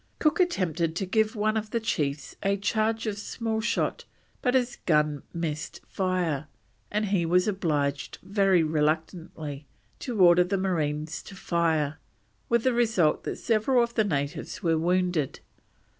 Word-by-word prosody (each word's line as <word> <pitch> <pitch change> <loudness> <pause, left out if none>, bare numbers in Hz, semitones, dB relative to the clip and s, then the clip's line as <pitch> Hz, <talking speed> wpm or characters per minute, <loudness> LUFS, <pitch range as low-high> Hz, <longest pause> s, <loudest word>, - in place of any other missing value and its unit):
Cook 305 +3 +2
attempted 170 - +1
to 190 - -1
give 220 +3 +1
one 215 +1 +1
of 215 -1 -2
the 230 - 0
chiefs 145 -10 -2
a 200 0 +1
charge 220 +3 0
of 210 -2 -2
small 220 +1 -3
shot, 230 +1 -1 0.4
but 250 0 +1
his 250 -1 +1
gun 150 -3 +2
missed 155 -3 -4
fire, 180 -6 -1 0.4
and 210 +1 0
he 195 -4 +2
was 180 +3 +3
obliged, 150 -8 -1
very 195 -2 +3
reluctantly, 155 -1 -2 0.3
to 240 -6 -4
order 175 -1 +7
the 190 +2 -1
marines 155 -4 -1
to 195 - -11
fire, 160 -5 0 0.5
with 235 -1 +2
the 255 - +3
result 220 -10 +2
that - - -2
several 235 +3 +2
of 235 0 -3
the 220 - +3
natives 150 -3 -3
were 165 -2 +3
wounded. 175 -3 0
180 Hz, 150 wpm, -27 LUFS, 155-215 Hz, 0.5 s, order